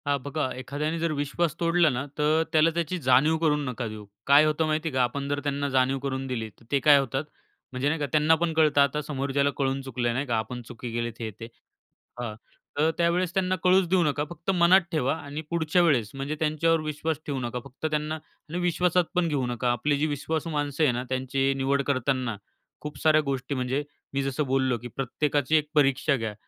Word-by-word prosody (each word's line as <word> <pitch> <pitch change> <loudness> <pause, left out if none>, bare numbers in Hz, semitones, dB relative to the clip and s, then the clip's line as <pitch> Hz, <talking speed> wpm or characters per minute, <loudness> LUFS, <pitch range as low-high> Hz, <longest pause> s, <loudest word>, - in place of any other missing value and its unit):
हां, 145 0 +2
बघा 145 -1 -2
एखाद्याने 150 +5 -3
जर 165 0 0
विश्वास 150 +3 -1
तोडला 170 -1 +3
ना 130 +1 -2
तर 155 +2 +3
त्याला 155 +1 +5
त्याची 170 +1 -1
जाणीव 140 +6 +5
करून 150 -2 +1
नका 125 -2 -3
देऊ. 105 -1 -8 0.2
काय 145 +2 +7
होतं 155 +1 +1
माहिती 155 +1 -1
आहे - - -11
का 130 -1 +3
आपण 140 +3 -2
जर 145 0 0
त्यांना 140 0 -1
जाणीव 130 0 +2
करून 135 -1 -2
दिली 115 -4 -3
तर 105 +3 -24
ते 140 - +3
काय 145 -1 +9
होतात, 135 +1 -2 0.5
म्हणजे 130 +2 -1
नाही 160 +1 -1
का 145 - 0
त्यांना 155 +1 +4
पण 165 0 -1
कळतं 155 -2 +4
आता 140 +2 +2
समोर 140 -2 -3
ज्याला 140 +1 +2
कळून 135 -1 0
चुकलंय 125 -3 -2
नाही 135 +4 -1
का 115 -2 +1
आपण 120 +3 -4
चुकी 120 -1 -7
केली 120 0 -2
हे-ते. 115 0 -6 0.7
हां, 120 -3 -4 0.4
तर 155 +2 +3
त्यावेळेस 175 +1 +1
त्यांना 185 -1 +1
कळच 185 0 +4
देऊ 180 -1 +3
नका, 145 -2 0
फक्त 170 +3 -3
मनात 175 +2 +6
ठेवा 145 -3 +1
आणि 145 -1 -6
पुढच्या 170 +1 +2
वेळेस 125 -11 +2
म्हणजे 140 +3 -3
त्यांच्यावर 160 +1 +2
विश्वास 155 +1 -2
ठेवू 140 -3 -3
नका 120 0 -3
फक्त 135 +3 -9
त्यांना 155 0 -1
आणि 160 +2 -9
विश्वासात 180 0 +2
पण 180 -1 +2
घेऊ 145 -5 0
नका. 120 0 0
आपली 140 +5 0
जी 150 +2 +1
विश्वासू 155 +3 -3
माणसं 145 -1 -1
आहेत 135 -5 +4
ना 125 - -2
त्यांची 130 +1 0
निवड 135 +1 +1
करतांना, 130 -4 0 0.4
खूप 150 -1 -7
साऱ्या 155 -1 +4
गोष्टी 140 -1 -3
म्हणजे 130 +3 -1 0.3
मी 140 0 0
जसं 135 +2 -1
बोललो 130 -2 +1
की 120 - -6
प्रत्येकाची 140 +4 -1
एक 150 -1 -1
परीक्षा 140 0 +3
घ्या. 110 -4 -3
145 Hz, 210 wpm, -26 LUFS, 130-155 Hz, 0.7 s, काय